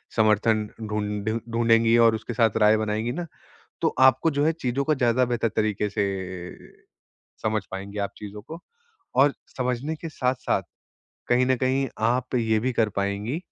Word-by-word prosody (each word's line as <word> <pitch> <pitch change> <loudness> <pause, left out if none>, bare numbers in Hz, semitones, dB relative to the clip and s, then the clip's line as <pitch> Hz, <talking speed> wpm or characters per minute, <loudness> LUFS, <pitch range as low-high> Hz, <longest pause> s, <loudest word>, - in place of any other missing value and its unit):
समर्थन 110 0 +3
ढूँढ 105 -1 -3 0.2
ढूँढेंगी 115 0 +4
और 115 -1 +4
उसके 110 +2 -6
साथ 115 -3 +2
राय 105 +1 +6
बनाएँगे 110 +2 -1
ना 175 +7 -4 0.6
तो - - +1
आपको 130 +4 +5
जो 145 -1 0
है 160 - +3
चीज़ों 140 -3 -2
को 155 - +2
ज़्यादा 125 -2 +2
बेहतर 120 -1 0
तरीके 105 -1 0
से 100 0 0 1.4
समझ 110 -1 0
पाएँगे 100 +2 -6
आप 100 - -2
चीज़ों 105 0 -8
को 160 +9 -9 0.6
और 140 0 +4 0.2
समझने 125 +4 -1
के 165 +1 -7
साथ-साथ, 125 -8 -1 0.6
कहीं 125 +1 +3
न 130 0 +3
कहीं 130 +2 +1 0.2
आप 125 +2 0
ये 110 -2 +2
भी 130 +4 -1
कर 115 -2 +2
पाएँगी 100 +8 -1
115 Hz, 160 wpm, -25 LUFS, 105-130 Hz, 1.4 s, राय